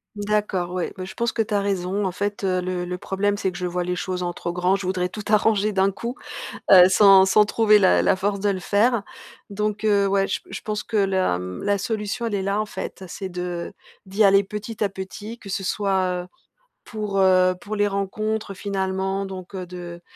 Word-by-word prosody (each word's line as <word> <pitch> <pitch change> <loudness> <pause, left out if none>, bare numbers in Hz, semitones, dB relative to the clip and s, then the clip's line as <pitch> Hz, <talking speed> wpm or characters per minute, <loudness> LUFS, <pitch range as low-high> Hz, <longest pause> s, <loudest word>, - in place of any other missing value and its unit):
D'accord, 205 -4 -1
ouais. 180 -2 -2
Beh, 185 - -5
je 190 - -9
pense 235 +1 -1
que 225 - 0
tu 215 -1 -3
as 205 - +2
raison, 195 0 -1
en 185 - 0
fait, 205 +2 -3
heu, 185 -1 +1
le 180 0 -3
le 180 0 -4
problème, 200 +2 -1
c'est 190 - 0
que 180 - -8
je 180 - -3
vois 180 0 -2
les 180 - -1
choses 180 0 -3
en 175 - -2
trop 175 - -4
grand, 180 +2 +1
je 195 -2 -4
voudrais 185 -1 0
tout 210 +3 -8
arranger 215 -1 +3
d'un 195 -1 +2
coup. 235 +5 -5 0.6
Heu, 185 -2 +10
sans 195 0 +7
sans 195 +2 +5
trouver 215 0 +4
la 190 -3 +4
la - - +3
force 200 +1 -1
de 205 - 0
le 190 -2 -1
faire. 220 +3 +2 0.5
Donc, 210 +1 -2
heu, 200 -2 +3
ouais, 195 0 +2
j - - -1
p - - -27
je 195 - -6
pense 210 -1 -3
que 225 - -6
la, 190 - +2
mmh, 90 0 -6
la 205 0 +2
solution, 215 +3 -3
elle 220 -3 -1
est 195 - -1
là, 200 +2 0
en - - -2
fait, 200 - -7
c'est 190 - -5
de 180 -1 -5 0.3
d'y 195 +3 +1
aller 195 0 +5
petit 210 +2 -7
à 210 - +3
petit, 195 +4 -8
que 200 - -11
ce 195 - -2
soit, 190 -3 0
heu, - - -13 0.6
pour, 210 -3 -3
heu, 185 -1 +5
pour 215 +1 -5
les 205 0 +2
rencontres, 215 +2 -2
finalement 195 0 -2
donc, 190 -1 -8
heu, 185 -1 -4
de, 175 -1 -8
195 Hz, 230 wpm, -23 LUFS, 185-210 Hz, 0.6 s, Heu